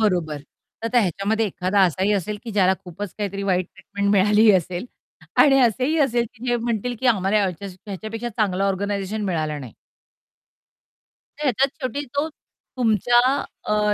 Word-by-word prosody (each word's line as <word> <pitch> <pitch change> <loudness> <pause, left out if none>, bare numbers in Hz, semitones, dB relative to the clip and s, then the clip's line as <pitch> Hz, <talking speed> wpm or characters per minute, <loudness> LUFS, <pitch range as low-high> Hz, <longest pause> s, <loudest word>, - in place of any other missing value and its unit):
बरोबर. 175 -8 +1 0.5
तर - - -1
आता 245 +2 +2
ह्याच्यामध्ये 205 +3 0
एखादा 190 +1 0
असाही 190 +4 +1
असेल 205 +1 -2
की 235 - -5
ज्याला 190 -2 +4
खूपच 185 +2 -7
काहीतरी 200 -1 -3
वाईट 185 -2 +1
ट्रीटमेंट 200 0 -2
मिळालीही 210 +2 +5
असेल 180 +2 -1 0.6
आणि 270 -2 +5
असेही 255 +7 +2
असेल 245 -4 +2
की 240 +1 -11
जे 240 0 +2
म्हणतील 235 0 -2
की 260 - 0
आम्हाला 200 -3 +3
ह्याच 185 0 -3 0.2
ह्याच्यापेक्षा 220 +4 -5
चांगलं 200 -4 0
ऑर्गनायझेशन 200 +1 -2
मिळालं 155 -5 -2
नाही. 120 -5 -10 1.7
तर 300 - -3
ह्याच्यात 270 +1 +2
शेवटी 260 +3 -3
तो, 290 +2 +1 0.5
तुमच्या 240 0 +3 0.4
अ, 210 0 +1
205 Hz, 150 wpm, -23 LUFS, 190-235 Hz, 1.7 s, मिळालीही